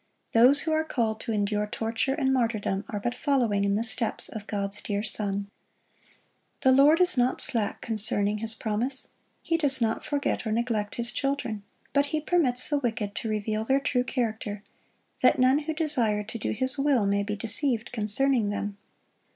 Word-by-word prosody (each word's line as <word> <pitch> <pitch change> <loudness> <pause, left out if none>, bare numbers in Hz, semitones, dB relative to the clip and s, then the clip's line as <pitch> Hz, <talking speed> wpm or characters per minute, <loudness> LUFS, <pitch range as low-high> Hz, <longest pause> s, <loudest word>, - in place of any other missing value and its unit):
Those 255 +5 +5
who 320 - -2
are 315 0 +1
called 225 -8 -2
to 230 - -4
endure 210 0 -1
torture 225 +5 -2
and 265 -3 0
martyrdom, 225 -5 -1
are 205 - -3
but 240 +4 -2
following 245 -7 0
in 200 0 +1
the 220 - 0
steps 230 0 +2
of 215 -2 -8
God's 200 0 -3
dear 205 0 -3
Son. 200 -2 -2 1.1
"The 260 - +4
Lord 285 +5 +5
is 360 -4 +3
not 245 +1 +1
slack 220 -4 -1
concerning 210 -1 +3
His 225 0 +4
promise."(67) 230 +5 -2 0.3
He 330 - 0
does 285 -5 +1
not 225 -2 -1
forget 285 -5 -2
or - - -2
neglect 220 -2 -2
His 235 -1 0
children; 275 -4 -2 0.3
but 280 +1 +2
He 310 +1 -1
permits 295 -6 +4
the 290 -2 0
wicked 225 -5 -3
to 225 - -4
reveal 215 0 -2
their 270 +4 +2
true 270 -3 0
character, 220 -5 -3 0.6
that - - +4
none 260 +2 +4
who 315 +1 -4
desire 240 -10 0
to 220 +3 -8
do - - -3
His 260 +4 0
will 275 -6 +2
may 200 0 +1
be 210 +1 -3
deceived 225 +2 -1
concerning 230 +1 0
them. 205 0 -4
230 Hz, 180 wpm, -26 LUFS, 210-270 Hz, 1.1 s, Those